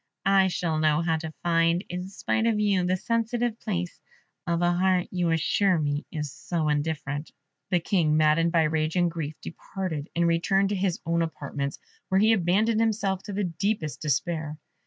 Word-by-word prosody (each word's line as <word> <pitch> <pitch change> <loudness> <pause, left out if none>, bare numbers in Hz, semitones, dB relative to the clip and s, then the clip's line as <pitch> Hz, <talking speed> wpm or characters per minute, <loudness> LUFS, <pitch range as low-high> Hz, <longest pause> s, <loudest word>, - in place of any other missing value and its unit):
I 195 -1 +5
shall 165 -3 -1
know 155 0 +3
how 165 -1 +1
to 160 0 -6
find, 170 +1 +2
in 180 +1 -5
spite 220 +3 -1
of 220 -2 +1
you, 200 -3 +2
the 185 +1 +1
sensitive 230 +2 -1
place 180 -5 -3 0.5
of 170 0 +1
a 175 - +4
heart 180 0 +2
you 180 -2 0
assure 175 +4 +2
me 145 -1 -2
is 150 -3 -4
so 165 -2 -2
indifferent." 145 -1 -2 0.4
The 180 -3 +2
King, 160 -4 +2
maddened 155 +2 +3
by 165 -2 +3
rage 155 +1 0
and 175 -2 +2
grief, 155 -2 -5
departed, 165 -4 -5
and 170 0 +2
returned 195 +4 +2
to 205 - -1
his 185 -2 0
own 170 0 +1
apartments, 140 -3 -3 0.3
where 190 - +2
he 220 +2 +5
abandoned 215 +4 +2
himself 210 -4 0
to 205 - -6
the 205 +1 -1
deepest 180 -2 -2
despair. 155 +1 -1
175 Hz, 180 wpm, -26 LUFS, 160-195 Hz, 0.5 s, I